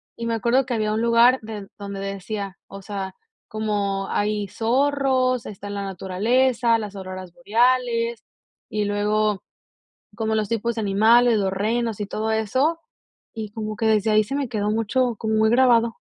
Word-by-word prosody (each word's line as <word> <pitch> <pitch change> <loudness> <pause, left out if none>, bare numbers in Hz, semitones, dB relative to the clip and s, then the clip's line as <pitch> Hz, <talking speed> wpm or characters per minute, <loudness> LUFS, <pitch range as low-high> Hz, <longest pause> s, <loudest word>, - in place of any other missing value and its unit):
y 235 - -5
me 230 - 0
acuerdo 240 +4 +2
que 250 - -3
había 215 -1 0
un 220 - 0
lugar 235 +2 +5
den 210 -3 -7
donde 200 -1 -6
decía, 195 0 -5
o 195 - -10
sea, 195 -1 -5 0.3
como 205 -3 -2
hay 210 -1 -1
zorros, 255 +1 +1
está 205 0 -8
en 205 - -5
la 200 - -3
naturaleza, 230 +6 +1
las 210 -2 -6
auroras 185 -2 -8
boreales, 235 -1 +1 0.5
y 210 0 -1
luego 210 0 0 0.7
como 220 -1 -1
los 215 -2 -1
tipos 230 +1 -1
de 225 - -2
animales, 220 +3 +4
los 195 -2 0
renos 220 +3 -1
y 205 - -3
todo 220 +2 -2
eso, 260 +10 +1 0.6
y 215 -2 -5
como 215 0 -5
que 225 0 0
desde 215 0 +2
ahí 215 0 +4
se 270 +7 -5
me 280 -3 -1
quedó 210 -3 -1
mucho, 230 +3 0
como 220 0 -2
muy 220 0 +3
grabado. 235 -2 +4
220 Hz, 170 wpm, -23 LUFS, 205-235 Hz, 0.7 s, lugar